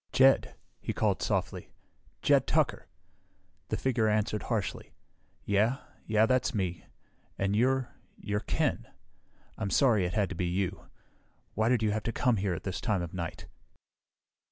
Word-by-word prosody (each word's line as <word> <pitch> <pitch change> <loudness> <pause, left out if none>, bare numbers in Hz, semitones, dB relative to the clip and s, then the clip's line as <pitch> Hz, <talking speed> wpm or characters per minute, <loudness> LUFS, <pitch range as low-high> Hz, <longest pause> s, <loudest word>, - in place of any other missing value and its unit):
"Jed," 135 +1 +4 0.2
he - - -3
called - - +1
softly. - - -2 0.5
"Jed - - +4
Tucker - - +1 0.4
" - - -40
The - - 0
figure 120 -4 +1
answered 105 0 +1
harshly, 110 -5 -3 0.5
"Yeah. 105 +6 +2 0.3
Yeah, 110 0 +4
that's 130 +1 +1
me, 90 -4 -2 0.5
and 100 +1 0
you're 130 +2 +2 0.3
you're 105 -1 -2
Ken. - - -1 0.7
I'm 100 - -1
sorry 110 -6 +3
it 90 - -5
had 105 -3 +1
to 95 - -5
be 90 +1 -1
you. 95 +1 -2 0.7
Why 110 +2 +1
did 120 -3 +2
you 105 - +2
have 110 +1 -1
to 115 - -2
come 125 +2 +2
by 105 - 0
here 95 -3 0
at - - -7
this 95 -2 -4
time 105 -6 0
of 85 - -7
night?" 85 -3 -5
105 Hz, 160 wpm, -30 LUFS, 95-115 Hz, 0.7 s, Jed